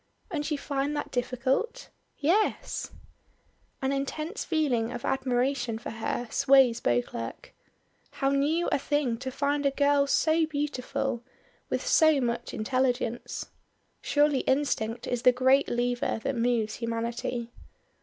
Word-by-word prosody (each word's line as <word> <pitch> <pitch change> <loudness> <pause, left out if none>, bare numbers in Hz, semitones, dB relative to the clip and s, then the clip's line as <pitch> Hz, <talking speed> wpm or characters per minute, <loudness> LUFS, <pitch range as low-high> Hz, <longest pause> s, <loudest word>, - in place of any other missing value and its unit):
"And 300 -3 -2
you 300 - 0
find 280 +1 -2
that 290 - -4
difficult?" 260 - -1 0.3
"Yes." 370 +9 0 0.9
An 265 - +1
intense 305 +8 -3
feeling 265 -9 0
of - - -5
admiration 250 -2 0
for 225 - -7
her 230 +2 -3
sways 260 -4 +5
Beauclerk. 120 -1 -2 0.6
How 270 -1 0
new 300 +5 +1
a - - +1
thing 280 -5 0
to 260 +1 -4
find 285 +2 0
a 280 - +4
girl 285 0 +2
so 315 +3 +3
beautiful, 275 -4 -2 0.5
with - - -2
so 315 - +5
much 240 -2 -2
intelligence. 245 +1 -1 0.5
Surely 290 -2 +3
instinct 240 -5 0
is 245 -1 -2
the 250 - +7
great 260 +2 +3
lever 245 -1 0
that 275 - -1
moves 230 -2 0
humanity. 235 +1 -3
265 Hz, 125 wpm, -28 LUFS, 240-290 Hz, 0.9 s, the